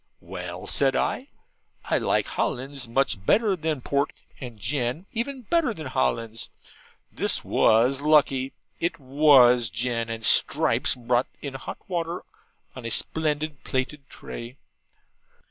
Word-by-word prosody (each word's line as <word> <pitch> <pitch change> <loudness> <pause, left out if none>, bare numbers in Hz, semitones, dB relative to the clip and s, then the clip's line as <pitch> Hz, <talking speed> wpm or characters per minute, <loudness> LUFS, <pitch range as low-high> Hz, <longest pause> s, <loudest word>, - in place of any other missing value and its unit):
'Well,' 90 0 -7
I - - -7
said, 135 -1 +2
'I 265 - -1 0.6
like - - +2
Hollands 135 0 -3
much 115 -5 0
better 205 - +3
than 155 -5 -2
port, 140 +3 -1 0.3
and 125 -4 -8
gin 125 - -2
even 255 +3 -3
better 270 -2 +1
than 155 - -7
Hollands.' 115 -4 -2 0.6
This - - 0
was 125 +5 +3
lucky. 140 -3 +3 0.3
It 170 - -2
WAS 130 -4 +5
gin; 115 +1 -2
and 115 -1 -4
Stripes - - +4
brought 125 0 0
in 140 -2 -6
hot 135 - -7
water 170 -1 -3 0.5
on 130 - -8
a 115 - -3
splendid 150 +3 -1
plated 135 +1 -3
tray. 120 +3 -9
135 Hz, 130 wpm, -25 LUFS, 120-155 Hz, 0.6 s, WAS